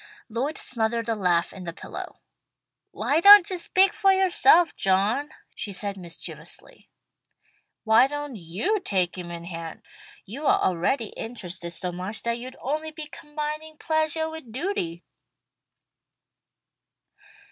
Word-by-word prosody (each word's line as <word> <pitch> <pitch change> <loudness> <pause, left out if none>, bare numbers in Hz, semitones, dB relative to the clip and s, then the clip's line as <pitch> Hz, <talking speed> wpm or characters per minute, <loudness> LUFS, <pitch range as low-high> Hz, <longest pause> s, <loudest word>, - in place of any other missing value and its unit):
Lloyd 260 +8 -2
smothered 230 -1 -1
a - - +2
laugh 180 -5 +1
in 185 - -9
the 170 -1 -5
pillow. - - -9 0.7
"'Why 295 - 0
don't 400 -1 +10
you 370 - -1
speak 375 +2 +4
for 395 -3 +4
yourself, 380 -2 +4
John,'" 205 +10 +1 0.2
she 205 - -5
said 200 +1 -3
mischievously. 175 -3 -9 0.9
"Why 225 +3 +5
don't 290 -2 -5
you 205 - -1
take 185 - 0
him 180 -2 -7
in 170 0 -7
hand? 165 -2 -7 0.4
You 275 +9 -5
are - - +4
already 200 +6 0
interested 185 -7 -7
so 180 +1 -4
much 185 +5 -6
that 235 0 -1
you'd 255 +2 -9
only 305 +4 -2
be 310 0 -7
combining 300 +1 -6
pleasuah 315 0 0
with 320 -8 -9
duty." 220 - -3
235 Hz, 130 wpm, -25 LUFS, -, 0.9 s, don't